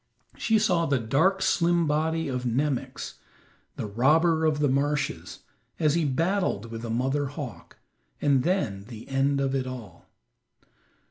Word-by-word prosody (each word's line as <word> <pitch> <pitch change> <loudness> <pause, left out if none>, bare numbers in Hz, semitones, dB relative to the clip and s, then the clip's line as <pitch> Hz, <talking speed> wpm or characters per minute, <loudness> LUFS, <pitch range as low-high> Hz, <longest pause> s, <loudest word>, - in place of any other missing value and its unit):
She 225 -1 +2
saw 180 -6 +2
the 140 -1 +2
dark, 160 - +2
slim 170 -2 +2
body 160 +2 0
of 125 -2 -3
Nemox, 130 +2 -2 0.6
the - - -4
robber 160 +9 +3
of 155 -1 +1
the 150 -1 +2
marshes, 145 +2 -1 0.4
as 155 -3 +3
he 170 -1 +1
battled 160 - 0
with 115 0 -6
the 115 - -5
mother 135 +5 0
hawk, 130 - -8 0.4
and 140 -3 +3
then 125 - -1
the 115 -1 -10
end 135 +1 +1
of 135 -1 0
it 130 -1 -1
all. 115 -9 -9
140 Hz, 145 wpm, -26 LUFS, 125-160 Hz, 0.6 s, robber